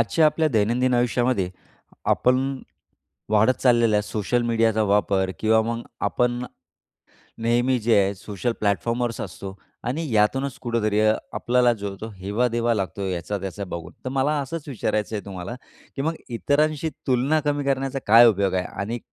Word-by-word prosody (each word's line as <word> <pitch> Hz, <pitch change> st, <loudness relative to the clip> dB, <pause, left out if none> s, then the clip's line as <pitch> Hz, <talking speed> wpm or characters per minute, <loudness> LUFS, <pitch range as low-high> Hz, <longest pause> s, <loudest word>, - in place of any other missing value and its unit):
आजच्या 155 Hz, +8 st, +3 dB
आपल्या 155 Hz, +1 st, +2 dB
दैनंदिन 120 Hz, +2 st, +1 dB
आयुष्यामध्ये, 120 Hz, -5 st, +1 dB, 0.5 s
आपण 130 Hz, +2 st, +2 dB, 0.7 s
वाढत 110 Hz, +4 st, +4 dB
चाललेला 120 Hz, -4 st, +4 dB
आहे 105 Hz, -, +2 dB
सोशल 110 Hz, +3 st, -1 dB
मीडियाचा 115 Hz, -2 st, +2 dB
वापर 100 Hz, -2 st, +2 dB
किंवा 110 Hz, 0 st, +4 dB
मग 115 Hz, +1 st, -3 dB, 0.2 s
आपण 125 Hz, 0 st, 0 dB, 1.0 s
नेहमी 120 Hz, +3 st, +2 dB
जे 115 Hz, 0 st, +3 dB
आहे 100 Hz, +1 st, 0 dB
सोशल 105 Hz, +5 st, -3 dB
प्लॅटफॉर्मवर 115 Hz, +4 st, 0 dB
असतो 95 Hz, +1 st, -8 dB, 0.3 s
आणि 155 Hz, +6 st, -2 dB
यातूनच 130 Hz, +6 st, +1 dB
कुठेतरी 110 Hz, -3 st, 0 dB
अ, 110 Hz, 0 st, +4 dB, 0.2 s
आपल्याला 125 Hz, 0 st, +2 dB
जो 100 Hz, -3 st, -5 dB
तो 110 Hz, -, -5 dB
हेवादेवा 115 Hz, +5 st, 0 dB
लागतो 95 Hz, -1 st, -3 dB
याचा 95 Hz, +3 st, -3 dB
त्याचा 95 Hz, +1 st, -5 dB
बघून. 85 Hz, -3 st, -7 dB
तर -, -, -1 dB
मला 135 Hz, +3 st, +1 dB
असंच 150 Hz, +3 st, -6 dB
विचारायचं 110 Hz, -4 st, -2 dB
आहे 105 Hz, -, -5 dB
तुम्हाला 95 Hz, +3 st, -6 dB, 0.4 s
की 135 Hz, -, -2 dB
मग 160 Hz, +3 st, -1 dB
इतरांशी 150 Hz, +6 st, +1 dB, 0.2 s
तुलना 135 Hz, +4 st, +2 dB
कमी 145 Hz, -1 st, 0 dB
करण्याचा 135 Hz, 0 st, -1 dB
काय 115 Hz, +3 st, +8 dB
उपयोग 100 Hz, -3 st, +2 dB
आहे 90 Hz, -1 st, 0 dB, 0.2 s
आणि 115 Hz, +4 st, -3 dB
115 Hz, 150 wpm, -24 LUFS, 105-130 Hz, 1.0 s, काय